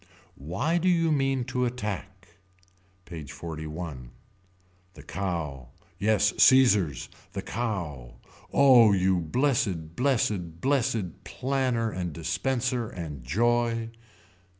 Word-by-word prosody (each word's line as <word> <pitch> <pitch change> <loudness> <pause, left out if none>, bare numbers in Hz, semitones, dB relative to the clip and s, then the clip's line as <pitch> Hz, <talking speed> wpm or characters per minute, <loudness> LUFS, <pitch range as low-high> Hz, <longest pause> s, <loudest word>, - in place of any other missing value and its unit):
Why 120 - -1
do 185 +2 +2
you 165 -2 +2
mean 135 -3 +1
to 125 +1 -2
attack. 105 -6 -4 0.8
PAGE 80 -5 -8
XLI. 75 -3 -7 0.9
The - - -12
Cow. 80 -9 -4 0.3
Yes 105 +1 +2
Caesars. 105 - +5 0.3
The - - -4
Cow. 85 - -4 0.4
Oh 125 -6 +7
you 95 -1 +2
blessed 85 - 0
blessed 105 - 0
blessed 110 -7 -1
planner 125 0 -1
and 90 -4 -4
dispenser 120 - -1
and 75 -7 -7
joy. 115 - +1
100 Hz, 100 wpm, -27 LUFS, 85-125 Hz, 0.9 s, Oh